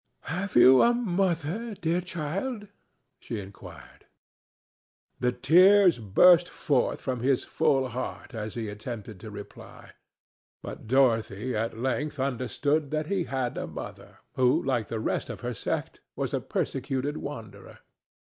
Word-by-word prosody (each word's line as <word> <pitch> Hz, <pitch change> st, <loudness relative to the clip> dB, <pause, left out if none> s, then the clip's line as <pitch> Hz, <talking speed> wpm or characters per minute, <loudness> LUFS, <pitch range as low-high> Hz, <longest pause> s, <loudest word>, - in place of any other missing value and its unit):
"Have 180 Hz, +6 st, -4 dB
you 125 Hz, +2 st, +8 dB
a 240 Hz, 0 st, +4 dB
mother, 195 Hz, 0 st, -1 dB
dear 170 Hz, +2 st, 0 dB
child?" 185 Hz, -, -4 dB, 0.5 s
she 115 Hz, -, -5 dB
inquired. 100 Hz, 0 st, -12 dB, 1.1 s
The 125 Hz, -, +2 dB
tears 180 Hz, +6 st, +5 dB
burst 175 Hz, -, +5 dB
forth 140 Hz, -5 st, 0 dB
from 130 Hz, -2 st, -3 dB
his 130 Hz, +1 st, +1 dB
full 135 Hz, -2 st, +1 dB
heart 125 Hz, +2 st, -6 dB
as 110 Hz, -2 st, -5 dB
he 115 Hz, -2 st, -3 dB
attempted 105 Hz, -1 st, -7 dB
to 110 Hz, -, -9 dB
reply, 105 Hz, -1 st, -11 dB, 0.7 s
but -, -, -8 dB
Dorothy 120 Hz, -2 st, +2 dB
at 110 Hz, +1 st, -2 dB
length 135 Hz, +4 st, -2 dB
understood 140 Hz, +3 st, 0 dB
that 155 Hz, +1 st, -1 dB
he 185 Hz, -4 st, 0 dB
had 130 Hz, -3 st, -2 dB
a -, -, -4 dB
mother, -, -, -9 dB, 0.2 s
who 125 Hz, -1 st, +3 dB
like 120 Hz, -6 st, 0 dB
the 115 Hz, -, -3 dB
rest -, -, -2 dB
of -, -, -7 dB
her -, -, -3 dB
sect -, -, -4 dB
was -, -, -3 dB
a -, -, +1 dB
persecuted 135 Hz, +2 st, -2 dB
wanderer. 115 Hz, -6 st, -8 dB
135 Hz, 135 wpm, -27 LUFS, 115-170 Hz, 1.1 s, you